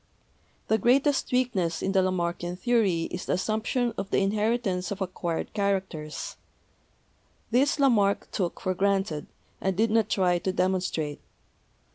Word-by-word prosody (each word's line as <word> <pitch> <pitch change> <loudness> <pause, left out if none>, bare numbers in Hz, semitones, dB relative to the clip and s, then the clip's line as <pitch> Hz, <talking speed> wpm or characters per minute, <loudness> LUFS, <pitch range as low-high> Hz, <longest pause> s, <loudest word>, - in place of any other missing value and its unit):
The 220 - +2
greatest 270 +6 +3
weakness 235 -10 0
in 195 - +1
the 190 -1 +4
Lamarckian 175 -1 -1
theory 195 -4 +2
is 180 - -5
the - - +1
assumption 220 +5 0
of 195 - -4
the - - +1
inheritance 205 -2 0
of 200 - -4
acquired 175 -3 -3
characters; 190 -7 -2 1.1
this 270 +6 +3
Lamarck 215 -8 +3
took 180 -4 -2
for 185 - 0
granted, 195 -5 0 0.3
and 190 -1 0
did 225 +1 +2
not 225 -1 +2
try 180 -2 +2
to 190 - -1
demon 185 0 +1
strate. 150 -5 -3
195 Hz, 140 wpm, -27 LUFS, 180-220 Hz, 1.1 s, the